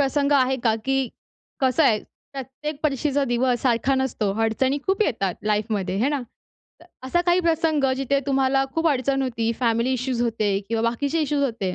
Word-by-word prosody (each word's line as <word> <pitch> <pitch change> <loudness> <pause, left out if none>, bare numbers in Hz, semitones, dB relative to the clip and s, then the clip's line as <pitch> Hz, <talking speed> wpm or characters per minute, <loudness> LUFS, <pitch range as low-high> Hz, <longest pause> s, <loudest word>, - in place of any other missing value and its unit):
प्रसंग 280 +1 +1
आहे 265 -1 +3
का? 225 - +4
की 270 -1 +1 0.5
कसं 265 +4 +3
आहे, 225 -7 +4 0.3
प्रत्येक 280 +2 -6
परीक्षेचा 285 -1 +1
दिवस 245 -1 +1
सारखा 255 +1 +2
नसतो. 250 -6 -1
अडचणी 260 +5 +1
खूप 385 +2 +2
येतात 200 - -1
लाईफमध्ये, 210 -3 -1
हे 235 +7 +2
ना? 290 -2 -1 0.6
त 335 - -16 0.2
असा 345 +7 +1
काही 350 +1 +4
प्रसंग 320 -3 +1
जिथे 275 +1 +1
तुम्हाला 270 0 +2
खूप 325 0 +2
अडचण 270 -1 +1
होती, 230 -3 -1
फॅमिली 235 +1 +1
इश्यूज 255 -1 -2
होते 215 -4 0
किंवा 225 -1 -1
बाकीचे 285 +7 -1
इश्यूज 295 -1 0
होते 210 -8 -2
265 Hz, 170 wpm, -23 LUFS, 230-280 Hz, 0.6 s, का